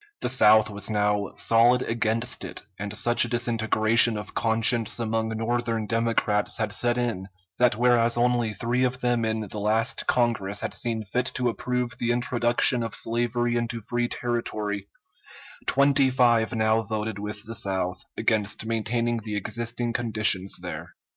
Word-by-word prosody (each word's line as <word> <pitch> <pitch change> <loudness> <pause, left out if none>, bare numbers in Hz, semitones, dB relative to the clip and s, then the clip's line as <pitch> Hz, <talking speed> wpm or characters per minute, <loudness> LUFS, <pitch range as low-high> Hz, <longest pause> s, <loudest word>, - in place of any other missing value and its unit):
The - - 0
South 110 -4 +4
was 100 0 -4
now 105 -1 0
solid 120 +2 +3
against 115 +1 -1
it, - - -6 0.2
and 100 0 -4
such 120 +2 +5
a - - +2
disintegration 115 -1 +2
of 105 - -8
conscience 115 0 +1
among 110 -1 -1
Northern 115 0 -2
Democrats 115 -2 0
had 105 -2 -2
set 120 +3 +1
in, 115 -6 -2 0.3
that 125 -3 +4
whereas 120 -1 +3
only 120 -2 +1
three 120 +4 -1
of 130 +1 -1
them 120 -1 +1
in 110 0 -1
the 105 0 -6
last 110 +5 0
Congress 105 -5 0
had - - -4
seen 115 -2 -2
fit 125 +6 -1
to 125 -1 +1
approve 125 0 -3
the 120 - -1
introduction 120 0 +2
of 115 - -4
slavery 120 +1 -1
into 120 0 -2
free 120 +2 -1
territory, 105 -5 -3 0.8
twenty 140 0 +4
five 120 -3 +2
now 110 0 +2
voted 110 -1 -4
with 105 +1 -6
the 115 - -6
South 95 -4 -2
against 105 0 0
maintaining 115 +1 -1
the 105 -1 -6
existing 115 +3 -2
conditions 105 -5 +1
there. - - -7
115 Hz, 155 wpm, -25 LUFS, 110-120 Hz, 0.8 s, such